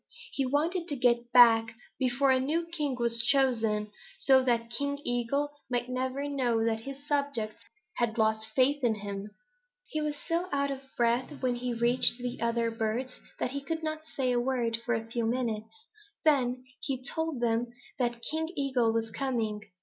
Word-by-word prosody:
He 270 -2 0
wanted 330 +6 0
to 290 - -1
get 240 -2 +2
back 230 -2 +6 0.2
before 265 +1 +2
a 260 - +4
new 315 +6 0
king 300 -5 -2
was 235 -1 +1
chosen, 225 -5 +2 0.3
so 265 -1 +5
that 235 -2 0
King 280 +3 -1
Eagle 245 +4 0 0.2
might 245 0 -1
never 260 +2 -2
know 245 -5 +1
that 225 -1 +1
his 275 +3 -8
subjects 280 -7 -1 0.3
had 235 -1 0
lost 220 0 +2
faith 275 +2 +3
in 230 -3 +3
him. 200 0 -6 0.6
"He 310 - -3
was 300 -1 -1
so 340 +2 0
out 280 0 +1
of 270 -1 -5 0.2
breath 245 +4 0
when 250 -1 +2
he 250 0 -2
reached 235 +1 +4
the 245 -1 -5
other 235 0 +1
birds 225 +3 -2 0.2
that - - -1
he 280 +1 -3
couldn't 310 +1 -3
say 265 -5 -1
a 245 - +2
word 240 -2 0
for 240 0 0
a 225 0 -3
few 230 0 -2
minutes. 235 - -3 0.4
Then 255 -4 +2 0.2
he 260 -2 -3
told 320 0 -3
them 235 0 +1 0.3
that 240 -2 -1
King 320 +1 -1
Eagle 260 -5 +1
was 225 -1 -1
coming. 225 -5 -2
250 Hz, 175 wpm, -29 LUFS, 230-280 Hz, 0.6 s, back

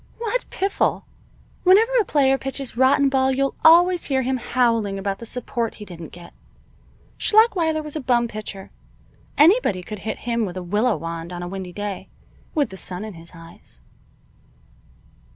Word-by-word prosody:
"What 470 +2 -3
piffle! 390 +1 -1 0.6
Whenever 410 +6 +5
a - - -3
player 270 -2 +3
pitches 270 -2 -4
rotten 265 +3 +4
ball 265 -1 +2
you'll 275 +1 0
always 350 +2 +6
hear 265 -2 0
him 260 +1 0
howling 230 -5 0
about 195 0 -3
the 230 - -7
support 235 -1 -3
he 210 - -10
didn't 170 -4 -10
get. 175 0 -13 0.9
Schlachweiler 355 -8 +3
was 300 0 -7
a - - -2
bum 240 -2 +2
pitcher. 215 -3 -8 0.7
Anybody 300 - +4
could 210 +2 -7
hit 220 - -5
him 235 -1 0
with 185 -3 -4
a 185 - -5
willow 210 +6 +1
wand, 165 +1 -6
on 175 0 -6
a - - -5
windy 185 -1 -6
day, 205 +1 -6 0.5
with 290 -7 +1
the 190 - -9
sun 185 +2 -4
in 215 - -8
his 165 0 -11
eyes." 165 - -15
235 Hz, 165 wpm, -22 LUFS, 195-285 Hz, 0.9 s, always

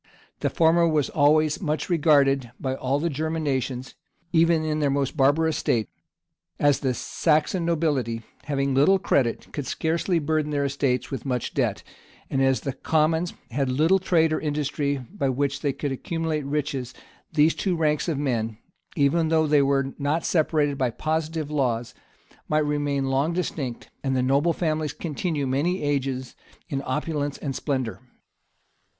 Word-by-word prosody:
The - - 0
former 170 +1 +4
was 155 -3 +1
always 155 +1 +3
much 155 -3 -1
regarded 140 -6 +3
by 130 -1 -2
all 135 +1 -1
the 170 - 0
German 160 +1 -2
nations, 130 -2 -2 0.4
even 165 -1 +4
in 155 0 -1
their 145 -2 +2
most 140 0 0
barbarous 155 +3 +3
state; 110 -4 0 0.7
and 145 - +4
as 145 - +2
the 130 -2 0
Saxon 160 +6 +1
nobility, 145 -9 0 0.2
having 140 -1 0
little 145 +9 +5
credit, 130 -10 0
could 145 -3 -4
scarcely 170 +2 0
burden 155 -1 0
their 145 -1 0
estates 135 -3 -1
with 135 -4 -4
much 125 -4 -2
debt, - - 0 0.5
and 135 - +1
as 135 -1 +2
the 135 - -3
commons 160 +5 +1 0.2
had 135 +2 0
little 160 +9 +3
trade 165 -4 +2
or - - 0
industry 145 -1 -1
by 135 - -3
which 140 +2 -1
they 145 - +1
could 140 +1 -3
accumulate 160 +2 -2
riches' 140 -3 -3 0.4
these 155 +1 +4
two 185 -3 -1
ranks 155 -1 +1
of 160 -4 0
men, 115 -6 -1 0.4
even 160 +3 +2
though 160 0 +3
they 150 -1 +4
were 135 -1 +1
not 145 +3 0
separated 150 -3 +1
by 130 -2 +2
positive 155 +4 -2
laws, 125 -4 -1 0.6
might 155 0 +2
remain 145 -2 0
long 135 +5 +1
distinct, 150 -8 -4
and 135 -1 0
the 125 - +1
noble 140 +6 +3
families 155 -3 -1
continue 155 -2 -2
many 150 +8 0
ages 135 -3 -2 0.3
in 135 -1 -2
opulence 145 +1 -2
and 135 -3 -4
splendor. 130 -6 -2
145 Hz, 160 wpm, -25 LUFS, 135-160 Hz, 0.7 s, little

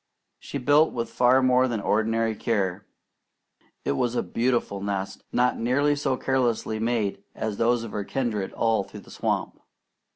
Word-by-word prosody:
She - - -5
built 145 +4 +4
with 115 -1 -3
far 125 +2 +4
more 130 0 +4
than 115 -3 -2
ordinary 110 +2 +1
care. 100 -3 -1 1.0
It - - +1
was 120 - 0
a - - +1
beautiful 120 -5 -1
nest, 100 -1 -3
not 125 0 +2
nearly 140 +5 +2
so 140 -3 -1
carelessly 120 -4 0
made 110 -4 -1
as 110 -2 -3
those 120 0 +2
of 115 - -7
her 105 - -3
kindred 110 -4 -2
all 115 -3 +1
through - - -11
the - - -16
swamp. - - -2
115 Hz, 160 wpm, -25 LUFS, 105-125 Hz, 1.0 s, built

